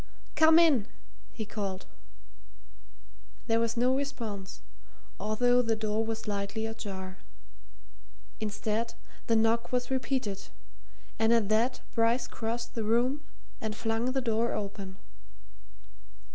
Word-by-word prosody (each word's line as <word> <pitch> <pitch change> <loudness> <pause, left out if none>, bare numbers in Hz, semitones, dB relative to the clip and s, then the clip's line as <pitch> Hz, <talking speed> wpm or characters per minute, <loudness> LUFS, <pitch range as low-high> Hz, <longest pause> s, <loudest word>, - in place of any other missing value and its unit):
"Come 315 0 +7
in!" 295 -11 +5 0.4
he 220 - -5
called. 200 -3 -4 1.6
There 225 -1 +3
was 230 0 0
no 250 +2 +4
response, 225 -8 -4 0.6
although 245 +4 +3
the 230 -2 +1
door 215 0 0
was 225 0 -2
slightly 205 +1 -2
ajar; 190 -4 -6 1.2
instead, 220 +2 -2 0.3
the 230 - +4
knock 225 +1 +2
was 250 0 0
repeated, 255 -6 -1 0.7
and 225 0 +4
at 230 -4 +4
that 225 +4 +2
Bryce 235 +2 +3
crossed 230 +1 -4
the 225 - -2
room 245 +6 +2 0.4
and 220 -1 -2
flung 225 +1 0
the 265 - +1
door 230 -1 +1
open. 195 -2 -5
225 Hz, 115 wpm, -30 LUFS, 210-240 Hz, 1.6 s, Come